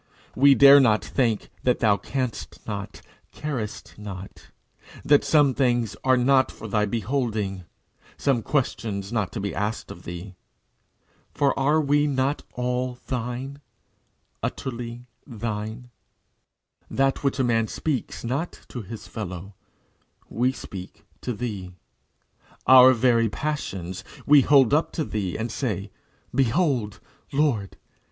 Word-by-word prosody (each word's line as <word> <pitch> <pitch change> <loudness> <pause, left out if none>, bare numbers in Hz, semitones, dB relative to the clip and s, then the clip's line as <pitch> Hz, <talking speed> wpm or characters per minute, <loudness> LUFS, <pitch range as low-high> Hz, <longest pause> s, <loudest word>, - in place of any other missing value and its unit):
We 140 +1 +6
dare 140 +1 +9
not 110 -6 +3
think 115 -5 0
that 125 - +2
thou 105 -3 +3
canst 130 +2 -4
not, 100 -2 -5 0.3
carest 125 -9 -5
not; 100 -2 -9 0.6
that 145 0 +5
some 145 -4 +4
things 120 -5 +1
are 130 -1 +4
not 130 +1 +3
for 110 - -9
thy 105 0 +1
beholding, 105 -4 -2 0.5
some 135 -5 +1
questions 105 -7 -2
not 100 -5 0
to 115 - -3
be 100 0 -3
asked 105 +2 -3
of - - -10
thee. 90 +3 -8 1.0
For 140 +1 +3
are 145 +4 +3
we 145 0 +2
not 140 +1 0
all 125 0 -2
thine 130 +3 -4 0.8
utterly 120 -1 -5 0.2
thine? 115 0 -5 1.0
That 135 +1 +1
which 140 -1 +1
a 135 - +2
man 115 -2 +2
speaks 145 0 -3
not 135 +9 -3
to 125 - -6
his 110 +2 -9
fellow, 95 -2 -6 0.8
we 125 +3 +1
speak 100 -5 -9 0.2
to 125 - -3
thee. 105 -6 -5 0.9
Our 130 0 +9
very 115 -2 +3
passions 95 - -4 0.2
we 145 -1 +7
hold 135 -2 +5
up 155 +2 +2
to 160 - -1
thee, 100 -9 -3
and 110 +1 -3
say, 105 -8 -3 0.4
"Behold, 130 - +1 0.3
Lord! 135 -9 0
120 Hz, 125 wpm, -25 LUFS, 105-135 Hz, 1.0 s, dare